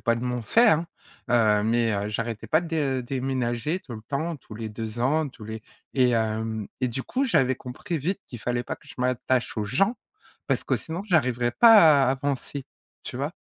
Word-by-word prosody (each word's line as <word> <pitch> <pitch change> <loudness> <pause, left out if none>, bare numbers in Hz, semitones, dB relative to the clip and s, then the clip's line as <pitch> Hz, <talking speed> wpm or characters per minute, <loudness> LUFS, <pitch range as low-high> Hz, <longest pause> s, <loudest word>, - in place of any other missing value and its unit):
pas 115 -2 +2
de 115 - -4
mon 125 -1 -2
fait, 230 - +5
hein! 165 +2 +2 0.4
Heu, 110 -3 +3
mais, 115 0 +2
heu, 100 +1 -1
j'arrêtais 115 +1 -4
pas 155 - +3
de 150 -6 -1
déménager 130 +4 -2
tout 120 - -9
le 110 - -9
temps, 155 +3 -2
tous 115 -4 -13
les 110 0 -5
2 110 +1 -6
ans, 150 +4 +2
tous 115 -4 -13
les 110 +1 -6 0.3
et 125 -2 +3
hem 110 -1 -1
et 130 - +2
du 125 +2 -3
coup, 265 - -1
j'avais 130 - +2
compris 155 +7 -5
vite 185 +8 -2
qu'il 120 - -8
fallait 120 +2 -1
pas - - -5
que - - -23
je - - -12
m'attache 125 -1 0
aux 105 - -1
gens, 195 - +1 0.5
parce - - 0
que - - 0
sinon 165 +3 -5
j'arriverai 125 - +2
pas 225 - +7 0.3
à - - +2
à - - +3
avancer, 140 0 -3 0.4
tu - - -6
vois? - - -2
125 Hz, 210 wpm, -25 LUFS, 115-145 Hz, 0.5 s, pas